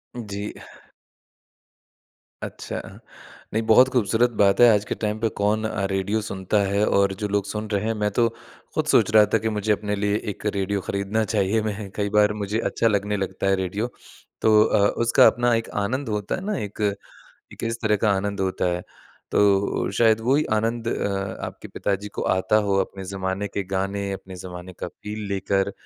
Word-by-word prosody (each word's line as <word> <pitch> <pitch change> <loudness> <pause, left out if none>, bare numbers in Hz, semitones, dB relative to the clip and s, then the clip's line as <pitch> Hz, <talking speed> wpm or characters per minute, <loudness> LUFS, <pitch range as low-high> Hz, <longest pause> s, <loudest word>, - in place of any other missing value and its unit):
जी। 105 -3 -5 1.9
अच्छा। - - -5 0.7
नहीं 110 - +1
बहुत 130 +3 +7
खूबसूरत 120 0 +3
बात 100 0 +3
है, 120 - +9
आज 105 +1 -1
के - - +1
टाइम 105 +1 -1
पे 115 - +1
कौन 105 +2 +1
अ, 100 -2 -1
रेडियो 100 +3 0
सुनता 95 +2 0
है 100 +1 +2
और 100 0 +3
जो - - +1
लोग 100 - +1
सुन 105 0 -4
रहे 100 0 0
हैं, 115 - +1
मैं 105 - +3
तो 115 -1 +5 0.5
खुद - - +1
सोच - - +4
रहा 105 -1 +8
था - - +6
कि - - +3
मुझे 105 +1 0
अपने 105 0 -2
लिए 105 0 +2 0.2
एक 105 - -15
रेडियो 100 0 -1
खरीदना 100 +3 0
चाहिए। 100 +2 +2
मैं 105 -1 -6
कई 100 0 0
बार 105 0 +5
मुझे, 105 +3 -1
अच्छा 115 - +1
लगने 105 +1 -1
लगता 100 - -4
है 95 - +4
रेडियो। 100 +6 -2 0.5
तो 110 -1 +4
अ, 100 -2 +3 0.2
उसका 115 - +6
अपना 120 0 +1
एक - - -14 0.2
आनंद 130 +2 -2
होता 105 -1 -3
है 190 - -7
ना 205 - -1
एक, 105 +2 -10 0.7
एक - - -7
इस 115 - -6
तरह 105 -2 +3
का - - +4
आनंद 100 0 -3
होता 90 - -2
है 90 - -6 0.5
तो - - +4 0.6
शायद, 110 -1 +4
वो 125 +4 +2
ही 155 - +2
आनंद 115 +1 -1
अ, 100 -3 -2
आपके - - -9
पिताजी 100 0 -2
को - - 0
आता 95 +3 +2
हो, 100 - +2
अपने 95 -1 -9
ज़माने 95 +1 -2
के 100 - +1
गाने, 100 +1 -1
अपने 95 -1 -12
ज़माने 90 0 -8
का - - -2
फ़ील 105 0 -7
लेकर। 100 0 0
105 Hz, 190 wpm, -24 LUFS, 100-110 Hz, 1.9 s, है